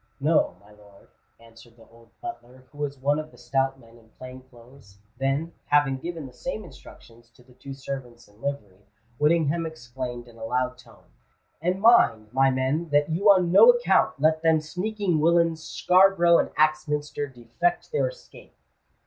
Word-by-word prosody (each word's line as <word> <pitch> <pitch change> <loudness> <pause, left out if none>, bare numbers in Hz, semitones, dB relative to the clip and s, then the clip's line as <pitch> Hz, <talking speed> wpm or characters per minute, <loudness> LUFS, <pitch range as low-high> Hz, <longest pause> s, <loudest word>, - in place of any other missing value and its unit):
"No, 155 +4 +1
my 100 +2 -21
lord," 105 -1 -20 0.3
answered 115 0 -18
the 115 - -18
old 115 0 -21
butler, 130 - -9
who 145 - -16
was 145 -1 -3
one 145 +3 0
of 155 0 -7
the - - -20
stout 135 +2 -1
men 115 -1 -19
in 110 -1 -24
plain 130 0 -10
clothes: 120 -4 -19 0.2
then, 140 +5 -1
having 145 -2 +2
given 165 0 -6
the 130 - -12
same 215 - -6
instructions 115 - -16
to 120 - -23
the 125 0 -22
two 135 +2 -10
servants 135 -3 -8
in 105 +2 -24
livery, 105 -9 -6 0.3
Whittingham 165 +1 +1
exclaimed 125 -4 -7
in 115 -1 -17
a - - -8
loud 125 +2 -2
tone, - - -19 0.6
"And 180 +3 -1
mind, 115 - +4
my 135 +1 +4
men, 135 +6 -1
that 145 +1 +1
you 195 +6 +2
on 185 -3 +4
no 465 - +8
account 485 - +3
let 155 +2 +2
them 160 -1 +3
sneaking 180 +2 -2
willains 165 0 +2
Scarborough 180 -1 +4
and - - 0
Axminster 150 -1 0
defect 130 - -3
their 465 - +1
escape!" - - -13
140 Hz, 170 wpm, -25 LUFS, 120-165 Hz, 0.6 s, no